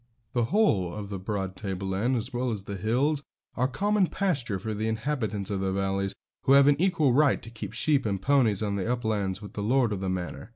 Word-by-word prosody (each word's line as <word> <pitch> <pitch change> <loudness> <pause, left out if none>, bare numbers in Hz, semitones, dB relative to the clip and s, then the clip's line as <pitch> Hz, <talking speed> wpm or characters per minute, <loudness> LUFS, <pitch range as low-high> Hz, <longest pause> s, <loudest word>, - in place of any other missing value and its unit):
The 120 -2 +2
whole 110 - +2
of 105 -1 -6
this 100 - -3
broad 95 -2 -3
tableland, 95 +5 -1
as 120 +2 -3
well 125 +1 -1
as 105 -4 -3
the 100 - -5
hills, 130 - +1 0.3
are 125 +1 +1
common 200 +7 +1
pasture 140 - -1
for 110 +4 -4
the 110 +1 -2
inhabitants 110 -4 -2
of 100 - -1
the 95 0 0
valleys, 95 0 -1 0.3
who 135 - +5
have 140 0 +7
an 145 +2 +4
equal 165 -8 +3
right 145 +1 +4
to 115 - -10
keep 110 -1 -7
sheep 140 +2 +2
and 100 -2 -1
ponies 115 -4 +2
on 100 -1 -1
the 100 +5 -1
uplands 105 -5 -1
with 105 - -9
the 105 - -4
lord 120 +1 +2
of 95 - -4
the 95 - -1
manor. 95 +3 -4
110 Hz, 220 wpm, -27 LUFS, 100-135 Hz, 0.3 s, have